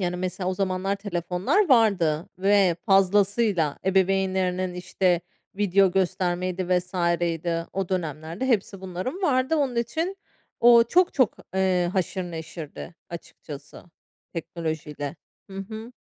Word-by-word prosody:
yani, 180 -1 -1
mesela, 185 0 -3
o - - -2
zamanlar 190 +1 -1
telefonlar 195 - 0
vardı 195 - +3
ve 195 -3 +3
fazlasıyla 195 -4 +3
ebeveynlerinin, 190 -1 +1
işte, 180 -1 0 0.4
video 195 -2 +3
göstermeydi 185 -1 -1
vs. 180 +1 -10 0.3
idi. 165 0 -1
O 195 -2 -2
dönemlerde 165 - -3
hepsi 200 -5 0
bunların 190 - -5
vardı. 275 -1 +2
Onun 270 -5 0
için 325 +11 -1 0.4
o 235 0 +8
çok 355 +9 +3
çok, 255 -5 +2 0.2
eee, 185 -2 +2
haşır 185 0 -1
neşirdi 165 -1 -8 0.2
açıkçası 150 -3 -10 0.5
teknolojiyle. 155 -3 -5 0.3
Hı 195 - -9
hı. 220 +4 -7
185 Hz, 115 wpm, -25 LUFS, 175-205 Hz, 0.5 s, o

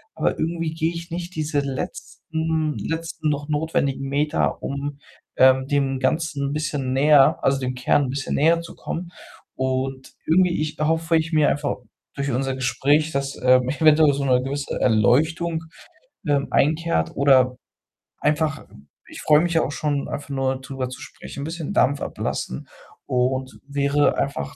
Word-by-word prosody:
aber - - 0
irgendwie 165 0 -2
gehe 165 +1 0
ich 170 +1 -7
nicht 175 +1 -5
diese 155 -2 -1
letzten 160 - -3
letzten 165 -1 -3
noch 145 0 -2
notwendigen 145 -3 -1
Meter, 150 +3 0
um, 140 +1 -4 0.4
ähm, 130 0 +5
dem 135 -2 0
Ganzen 140 0 0
'n - - -3
bisschen 145 -4 -2
näher 140 0 +5
also, 135 0 +2
dem 130 -1 -3
Kern 125 +3 +2
'n - - -4
bisschen 135 +1 -3
näher 165 +3 +4
zu 170 - -11
kommen 175 +1 -6 0.4
und 130 0 -2
irgendwie, 175 0 +3
ich 155 0 -3
erhoffe 165 +2 +1
ich 160 +1 -2
mir 150 -1 +4
einfach 145 0 -1 0.4
durch 140 -1 -2
unser 135 +1 -1
Gespräch, 145 +4 +1
dass, 140 -1 -3
ähm, 125 0 +4
eventuell 155 0 +5
so 140 0 -2
'ne 125 -1 +3
gewisse 140 +1 -3
Erleuchtung, 160 - +2 0.6
ähm, 140 -1 +1
einkehrt 155 - +1
oder 130 -2 +4 0.6
einfach 155 +1 0 0.4
ich - - -9
freue 150 0 +5
mich 175 0 0
ja 160 - +4
auch 145 - -3
schon, 145 -1 -2
einfach 145 - -6
nur 135 -1 -1
drüber 130 -1 -5
zu 130 - -9
sprechen, 140 - -9
'n - - -4
bisschen 160 -1 -5
Dampf 140 +1 +2
ablassen 65 - -4 0.4
und 130 +1 -1
wäre 140 +1 +1
einfach 135 - -3
145 Hz, 160 wpm, -23 LUFS, 135-160 Hz, 0.6 s, ähm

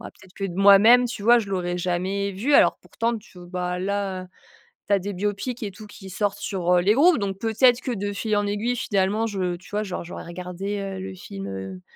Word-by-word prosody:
bah, - - -9
peut 190 - -19
être 185 - -23
que 195 - -4
de 185 -3 -4
moi 200 0 +8
même, 245 +4 +7
tu 235 -4 -6
vois, 240 +3 +6
je 215 -4 -4
l'aurais 180 -2 -2
jamais 185 +3 -1
vu. 240 +10 0
Alors - - +5
pourtant, 230 +1 -2
tu 205 -4 -17
v 175 - -11
bah 180 0 -3
là, 190 -1 -2 0.6
tu 200 - +2
as 200 - +4
des 200 +2 -5
biopics 205 +6 -3
et 205 - -4
tout 210 +3 -12
qui 195 -2 -12
sortent 205 +2 -2
sur, 180 -3 -1
heu, - - +3
les 200 +4 +4
groupes. 315 +7 +5
Donc 195 -2 -3
peut 225 +1 -2
être 250 -1 +6
que 255 - -3
de 205 -2 -3
fil 215 +1 -1
en 205 - +1
aiguille, 210 +4 -1
finalement, 205 +2 0
je 185 -4 -2
tu 180 - -17
vois, 210 +1 -1
genre, 190 -4 -5
j'aurais 170 - -8
regardé, 180 +3 -5
heu, 195 -1 -5
le 190 0 -6
film, 100 - -8
heu, 95 -1 -7
195 Hz, 250 wpm, -24 LUFS, 185-210 Hz, 0.6 s, moi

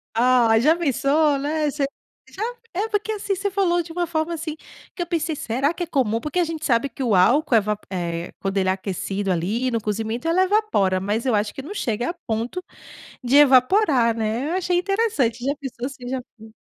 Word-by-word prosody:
Ah, 235 -2 +4
já 305 +7 +4
pensou 290 -1 +2
né, 300 +1 0
você 285 -1 -1 0.4
já? 410 - -5 0.3
É, 410 +5 -1
porque, 425 0 -1
assim, 405 -1 -2
você 400 +2 -2
falou 360 -3 +1
de 330 0 -10
uma 350 0 0
forma, 320 +1 -1
assim, 315 -1 -4 0.4
que 350 - -5
eu 345 - -2
pensei: 330 -2 -1
"Será 270 +8 0
que 350 - -4
é - - -2
comum?" 230 -7 +1
Porque 300 +7 -2
a 355 - +4
gente 320 -1 -4
sabe 245 +1 +2
que 265 - -9
o 220 -5 +2
álcool 250 - +4
eva 210 -1 +1
eh, 170 -2 -3
quando 195 0 -2
ele 190 -1 +2
é - - +4
aquecido, 195 0 -3
ali, 215 +9 -1
no 230 - 0
cozimento, 220 +7 -3
ela 365 +3 +3
evapora 375 - +2
mas 210 +5 -2
eu 255 - +2
acho 205 0 0
que - - -6
não 320 +10 -8
chega 240 - -2
a - - -2
ponto 230 +11 -2 0.6
de 260 +4 +4
evaporar, 260 - +5
né, 225 +6 -1
eu - - -1
achei 360 -1 +1
interessante. 360 - 0
Já 280 +2 0
pensou 265 -3 -6
se 260 -3 -10
já 240 -4 -7
270 Hz, 210 wpm, -22 LUFS, 225-335 Hz, 0.6 s, evaporar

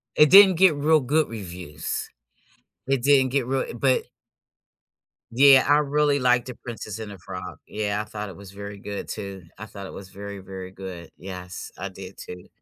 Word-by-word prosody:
It 150 -1 +6
didn't 195 -1 +9
get 185 -2 +5
real 155 +2 +4
good 150 +4 +1
reviews. 90 -8 -5 0.8
It 135 -2 +1
didn't 135 -1 +4
get 130 -2 0
real 135 0 -2
but 130 +2 +2 1.3
Yeah, 135 +2 +7
I 145 +1 +5
really 145 0 +2
liked 125 -1 +3
The 125 - -7
Princess 110 -3 -7
and 110 -2 -6
the 100 - -9
Frog, 90 -3 -8
yeah, 105 -1 -2
I - - -7
thought 105 -1 -6
it 95 - -11
was 100 -1 -12
very 100 0 -8
good 100 0 -6
too, 100 -3 -6
I 110 - -7
thought 100 -2 -9
it - - -8
was 100 - -9
very, 100 +1 -8
very 95 -1 -8
good, 95 -3 -9
yes, 90 -1 -8
I 100 +2 -4
did 95 0 -11
too. 90 0 -10
105 Hz, 185 wpm, -24 LUFS, 95-135 Hz, 1.3 s, didn't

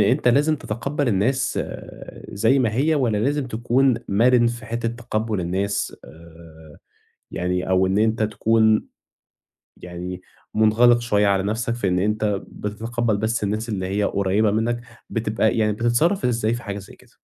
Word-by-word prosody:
أنت 125 +6 +3
لازم 145 +5 +3
تتقبَّل 135 +4 -3
الناس 120 +6 +1 0.7
زي 115 +7 +2
ما 115 -4 +1
هي، 150 +6 +2
والّا 120 -8 +1
لازم 140 +4 0
تكون 125 +3 +2
مَرِن 120 +4 +4
في 115 -1 -4
حتّة 115 0 -2
تقبُّل 115 -3 -3
الناس، 95 +4 -2
آآ، 80 -1 -15 0.5
يعني 90 +1 -2
أو 95 0 +3
إن 95 +2 +1
أنت 110 +1 +1
تكون 110 0 +2 0.9
يعني 90 +1 -7 0.3
مُنغلِق 115 +3 +5
شوية 105 -3 +1
على 100 -1 +2
نَفْسك، 115 +3 -2
في 110 -5 -1
إن 90 0 +1
أنت 105 0 0
بتتقبَّل 115 +2 -2
بس 110 +1 -1
الناس 110 +3 -2
اللي 95 -4 -2
هي 100 +2 0
قريّبة 100 +2 +1
منّك، 115 +3 0 0.3
بتبقى 110 -1 0
يعني 105 -1 +2
بتتصرّف 120 - +1
إزاي 115 -2 +1
في 120 - -6
حاجة 100 0 -5
زي 100 - -12
كده؟ - - -22
110 Hz, 155 wpm, -22 LUFS, 100-120 Hz, 0.9 s, مُنغلِق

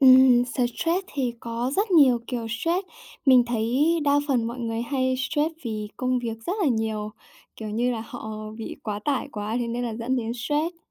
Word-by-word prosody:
Ừm, 255 -2 +7
stress 270 +9 0
thì 255 -4 -1
có 235 +2 -2
rất 405 +1 +1
nhiều 275 -9 +6
kiểu 240 -3 -3
stress. 335 - -1 0.4
Mình 255 -2 +7
thấy 235 +4 +1 0.2
đa 285 0 +4
phần 245 -5 +2
mọi 235 +2 -5
người 230 -1 -2
hay 260 0 0
stress 300 +4 0
vì 215 -2 -3
công 255 0 +1
việc 230 -2 -4
rất 355 - 0
là 310 - +4
nhiều, 220 -2 -1 0.5
kiểu 215 -1 -6
như 235 +4 +1
là, 225 - -3
họ 215 -4 -7
bị 225 - -6
quá 210 -2 -3
tải 280 -3 0
quá 210 +2 -3
thế 240 -1 -2
nên 240 +1 -2
là 230 -2 -3
dẫn 235 +3 -1
đến 230 -2 -2
stress. 295 +7 -1
245 Hz, 200 wpm, -25 LUFS, 225-270 Hz, 0.5 s, Ừm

